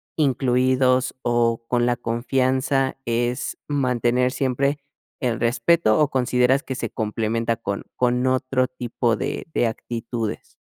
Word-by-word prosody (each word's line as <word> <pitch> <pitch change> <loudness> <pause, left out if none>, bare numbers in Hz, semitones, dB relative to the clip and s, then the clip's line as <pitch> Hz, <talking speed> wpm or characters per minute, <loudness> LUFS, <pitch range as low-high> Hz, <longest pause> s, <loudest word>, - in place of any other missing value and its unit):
incluidos 130 -2 +2
o 115 -1 +1
con 120 0 +1
la 120 - +2
confianza, 130 +3 0
es 120 +2 -1
mantener 125 -3 +1
siempre 140 +2 0 0.4
el 120 -5 -1
respeto 120 +2 +3
o 150 -2 +3
consideras 125 +1 +2
que 130 - -5
se - - -4
complementa 115 +1 -1
con 100 -3 -4
con 125 0 +1
otro 130 0 +1
tipo 120 -2 -1
de - - -4
de - - +3
actitudes? 115 0 -4
125 Hz, 125 wpm, -23 LUFS, 115-130 Hz, 0.4 s, respeto